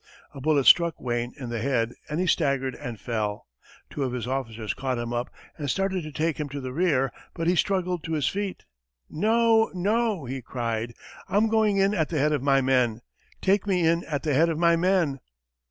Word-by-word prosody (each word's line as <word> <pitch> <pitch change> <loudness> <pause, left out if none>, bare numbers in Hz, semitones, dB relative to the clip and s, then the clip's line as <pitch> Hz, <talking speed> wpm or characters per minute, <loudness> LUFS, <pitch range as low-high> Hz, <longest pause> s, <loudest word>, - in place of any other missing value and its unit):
A 135 - -9
bullet 145 -2 +2
struck 170 -3 +5
Wayne 120 -1 -2
in 125 -3 -6
the 115 - -2
head, 120 -3 0 0.2
and 150 +2 -2
he 185 - +1
staggered 140 -6 +1
and 120 -3 -7
fell. 105 -2 -3 0.5
Two 145 - -5
of 130 -2 -1
his 125 -2 -3
officers 115 -4 -3
caught 130 -2 -2
him 120 0 -3
up 120 +1 -2 0.3
and 145 -2 -3
started 195 +3 0
to 155 -1 -7
take 155 +1 -1
him 150 -1 -3
to 140 +1 -5
the 130 -1 -6
rear, 140 -6 +1 0.2
but 165 - -3
he 175 +2 +3
struggled 180 -3 0
to 165 - -3
his 150 -4 +1
feet. 200 -1 -3 0.5
"No, 225 +4 +3
no," 205 - 0
he 130 +1 -5
cried, 115 -2 -3 0.3
"I'm 215 +3 +3
going 215 -2 +2
in 195 +1 +3
at 160 -6 0
the 165 - -2
head 150 +2 +2
of 145 - 0
my 135 0 +3
men! 125 -3 +2 0.4
Take 195 +1 +2
me 180 -4 +2
in 170 +1 +2
at 145 -3 -3
the 150 -2 0
head 160 +5 +4
of 160 - -1
my 170 0 +4
men!" 170 -5 +1
150 Hz, 210 wpm, -26 LUFS, 125-180 Hz, 0.5 s, struck